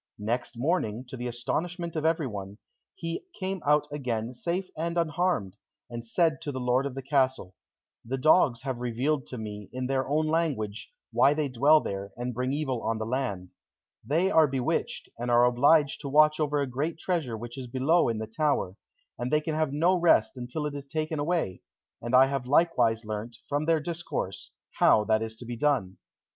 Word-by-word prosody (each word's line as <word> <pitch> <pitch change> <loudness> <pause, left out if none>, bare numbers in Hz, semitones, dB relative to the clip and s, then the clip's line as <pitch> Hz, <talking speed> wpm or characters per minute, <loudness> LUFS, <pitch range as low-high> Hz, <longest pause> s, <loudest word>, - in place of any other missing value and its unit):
Next 115 +3 -3
morning, 125 - -1
to 130 - -6
the 125 0 -4
astonishment 170 +8 -3
of 155 0 -1
everyone, 105 - -1 0.4
he 165 - -5
came 190 -1 -3
out 150 0 +3
again 125 -5 -3
safe 175 +9 -2
and 170 +2 -2
unharmed, 160 - 0 0.3
and 120 0 -5
said 160 +6 +1
to 150 -3 -4
the 130 - -4
lord 125 +2 +1
of 135 - -8
the 135 - -5
castle, 130 -8 0 0.5
"The 130 +3 -3
dogs 130 -3 +4
have 130 -3 -3
revealed 125 +4 -1
to 125 - -6
me, 105 -2 -7
in 130 0 -4
their 130 0 0
own 155 +2 +2
language, 150 -11 -1 0.2
why 145 - +4
they 150 -2 -1
dwell 145 +5 +5
there, 100 0 -5
and 125 +1 -3
bring 125 +2 -1
evil 135 -5 -2
on 115 0 -1
the 110 - -3
land. 110 -7 -3 0.5
They 170 +7 +1
are 160 -1 +6
bewitched, 130 -2 -2
and 120 +1 -3
are 120 0 +5
obliged 140 +4 +3
to 140 - -5
watch 155 +2 +5
over 150 -1 +1
a 140 - +1
great 145 +6 -2
treasure 160 -10 -2
which 120 +2 -8
is 130 -2 -6
below 135 +6 +2
in 115 - -1
the 110 - -3
tower, 110 -5 -1 0.4
and 120 +1 -2
they 150 - +4
can 155 +1 -3
have 155 -2 0
no 165 +6 +3
rest 170 -5 +3
until 125 +5 -4
it 150 - -3
is 140 -1 -7
taken 155 +1 -2
away, 155 - -1 0.4
and 120 +2 0
I 130 +1 +8
have 135 -2 -3
likewise 130 -7 +3
learnt, 110 +2 -5
from 145 +1 -1
their 165 0 +3
discourse, 160 - -4 0.3
how 105 - +5
that 110 0 +2
is 110 0 -4
to 120 - -11
be 120 0 -5
done." 125 -9 0
135 Hz, 195 wpm, -28 LUFS, 120-155 Hz, 0.5 s, I